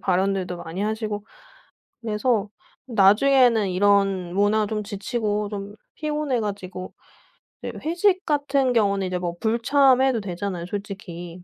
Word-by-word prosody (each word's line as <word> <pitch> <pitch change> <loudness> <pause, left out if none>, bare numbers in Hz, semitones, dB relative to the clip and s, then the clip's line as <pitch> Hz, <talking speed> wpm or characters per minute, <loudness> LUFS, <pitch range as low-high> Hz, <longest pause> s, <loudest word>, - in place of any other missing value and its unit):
발언들도 190 -1 0
많이 175 +2 -6
하시고 215 -1 -3 0.8
그래서 215 -1 0 0.4
나중에는 230 0 +4
이런 195 -2 +2
문화 205 +2 +2
좀 210 -1 -3
지치고 210 0 -2
좀 205 0 -6 0.2
피곤해 300 -4 -1
가지고 190 -3 -5 0.7
이제 - - -6
회식 365 +3 +2
같은 280 -4 +1
경우는 200 -4 +2
이제 180 0 -2
뭐 175 -1 -3
불참해도 255 +2 +3
되잖아요 180 -2 -4
솔직히. 180 -3 -7
205 Hz, 285 characters per minute, -23 LUFS, 190-240 Hz, 0.8 s, 나중에는